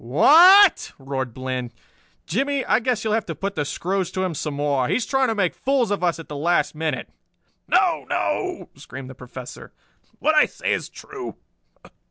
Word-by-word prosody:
"Wh 125 +7 -1
a 370 +6 +9
a 385 - +3
t?" - - -10
roared 135 -2 -4
Bland. 130 -2 -5 0.5
"Jimmie, 275 - -1
I - - +3
guess 245 -1 -1
you'll 220 -1 -1
have 225 -1 -1
to 165 - -5
put 195 +4 -4
the 150 - -2
screws 185 +5 -2
to 185 - -1
him 185 -2 -2
some 150 -1 -4
more. 140 -3 0
He's 250 - 0
trying 270 -1 +1
to 225 - -1
make 185 -4 0
fools 260 -5 0
of 200 -3 -2
us 170 -2 +1
at 165 - -10
the 150 - -7
last 170 +5 +1
minute!" 155 0 -3 0.6
"No, - - +1
no!" - - -2
screamed 130 -1 -10
the - - -10
Professor. 125 0 -11 0.4
"What - - +1
I - - +5
say - - -2
is - - -3
true. - - -9
175 Hz, 200 wpm, -22 LUFS, 140-225 Hz, 0.6 s, a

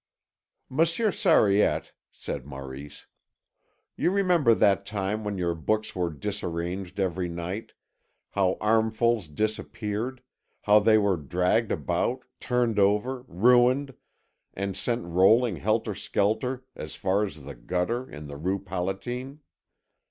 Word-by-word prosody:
"Monsieur 165 - +1
Sariette," 160 - +3 0.2
said 70 - -6
Maurice, 70 +1 -9 0.9
"you - - +1
remember 180 - +3
that 100 -2 +3
time 105 +1 -3
when 105 -1 -3
your 85 -2 0
books 110 +7 -1
were 90 -2 0
disarranged 90 +1 -4
every 90 -2 -1
night, 90 +6 -5 0.6
how 95 -2 +1
armfuls 110 -1 +2
disappeared, 110 - -3 0.4
how 105 0 +6
they 110 +1 +5
were 100 -3 +2
dragged 90 - 0
about, 75 - -1
turned 120 -4 0
over, 105 +6 +1
ruined, 125 +7 +3 0.6
and 100 0 -3
sent 120 0 -1
rolling 95 +5 +4
helter 110 +3 0
skelter 125 +7 -1
as 75 - -6
far 100 +1 +1
as 80 -8 -6
the 70 +1 -8
gutter 90 - -2
in 75 0 -9
the 70 -1 -8
Rue 95 +6 -1
Palatine. 100 - -4
105 Hz, 120 wpm, -27 LUFS, 90-120 Hz, 0.9 s, how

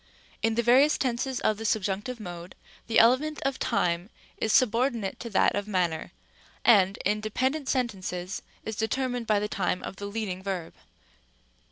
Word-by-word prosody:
c. - - +3
In 225 - 0
the 235 - +1
various 265 +6 +5
tenses 255 0 -1
of 215 - +1
the 225 - -6
subjunctive 215 +3 -1
mode, 175 -3 -8 0.3
the 225 - +1
element 265 +7 +4
of 275 -1 -1
time 180 -3 0 0.3
is 220 - 0
subordinate 235 -4 +2
to 235 - -6
that 195 - +3
of 205 0 -2
manner, 175 -5 -1 0.5
and, 200 -3 +5
in 210 +1 +1
dependent 260 +7 -1
sentences, 190 -7 -2 0.2
is 220 - -4
determined 245 +2 -1
by 215 -2 +3
the 210 - -1
time 185 -3 -1
of 195 - -6
the 200 - -5
leading 200 -3 -4
verb. 190 -4 -4
215 Hz, 165 wpm, -27 LUFS, 195-245 Hz, 0.5 s, various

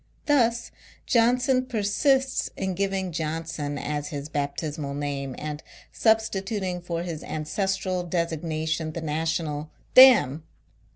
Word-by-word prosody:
Thus, 240 -5 +2 0.3
John 240 +1 +3
son 255 0 +1
persists 260 +5 +1
in 190 -1 -2
giving 195 0 -1
Johnson 160 -2 -3
as 145 0 -3
his 145 0 -6
bap 145 -1 -2
tismal 150 -2 -4
name, 140 -2 -3
and 150 0 -5 0.3
substituting 195 -4 0
for 170 -1 -3
his 165 -3 -5
ancestral 190 +3 -2
designation 160 -2 -2
the 170 - -5
national 155 -1 -2
" - - -35
Dam! 240 - +8
170 Hz, 120 wpm, -26 LUFS, 150-205 Hz, 0.3 s, Dam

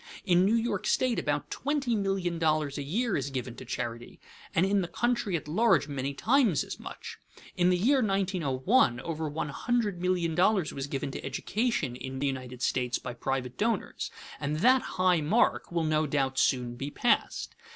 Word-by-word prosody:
In 180 -2 +4
New 215 +4 +3
York 225 -4 -1
state 250 -3 +2
about 145 0 -2
twenty 280 -4 -1
million 195 -4 -1
dollars 155 -3 +1
a - - -2
year 205 - -1
is 140 0 -1
given 125 -3 -4
to 130 - -9
charity, 120 -1 -5 0.4
and 175 - +4
in 200 0 +2
the 175 - -2
country 235 -3 0
at 150 - -9
large 200 0 +3
many 140 -1 -3
times 230 - +3
as - - -7
much. - - -9 0.4
In 180 0 +3
the 180 - +3
year 260 +8 +3
1901 185 - +2
over 160 -2 -3
one 150 0 -3
hundred 210 +2 -1
million 180 -2 +1
dollars 180 0 +2
was 135 0 -4
given 135 -1 -3
to - - -6
education 155 - -1
in 130 +1 -6
the 140 - -1
United 130 -2 -4
States 125 -1 0
by 125 - -6
private 125 0 -3
donors; 225 -2 -1 0.3
and 150 +2 -2
that 255 +3 +5 0.2
high 185 -3 +3
mark 205 +8 +2
will 170 -1 0
no 155 0 +1
doubt 135 -2 0
soon 125 -2 +1
be 135 +3 -4
passed. 240 +10 0
165 Hz, 180 wpm, -29 LUFS, 135-205 Hz, 0.4 s, that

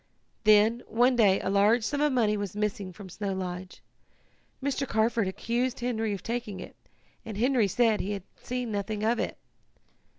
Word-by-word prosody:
"Then, 215 +3 +5
one 245 +3 +3
day, 200 -5 +4
a 190 - -1
large 210 +4 +4
sum 285 +7 -1
of 300 0 +3
money 225 -5 +2
was 205 -2 -4
missing 205 -2 -2
from 190 +2 -11
Snow 195 +2 -4
Lodge. 185 -1 -6 0.8
Mr. 275 0 -1
Carford 225 -2 +1
accused 235 +6 -1
Henry 225 -3 -1
of 200 - -4
taking 230 -5 -4
it, - - -9 0.5
and 220 -4 -7
Henry 245 -2 +3
said 225 +2 +2
he 205 - -3
had 200 -3 -5 0.2
seen 250 -2 -3
nothing 205 +1 -3
of 230 +2 +2
it. - - -2
215 Hz, 170 wpm, -28 LUFS, 200-240 Hz, 0.8 s, Then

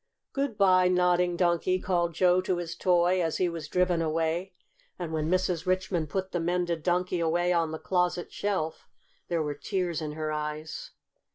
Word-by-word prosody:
"Good 275 -6 -1
by, 185 -2 +5
Nodding 180 -1 +2
Donkey!" 175 +1 +2
called 175 -3 0
Joe 180 +1 +4
to 185 -1 -1
his 170 -1 -4
toy, 180 0 +3
as 165 -2 0
he 185 - +2
was 165 -3 -5
driven 180 0 +1
away; 165 +3 -1 0.4
and 170 -3 -5
when 155 0 -1
Mrs. 185 -1 0
Richmond 185 -4 0
put 190 +3 -3
the 175 - -1
mended 175 -1 0
Donkey 180 +1 0
away 175 +2 +1
on 165 -2 +1
the 160 - -4
closet 180 0 -1
shelf, 190 -6 -2 0.4
there 170 -2 0
were 150 -1 -2
tears 180 -1 -2
in 150 -1 -4
her 155 0 -3
eyes. 150 +1 -4
175 Hz, 175 wpm, -28 LUFS, 165-185 Hz, 0.4 s, by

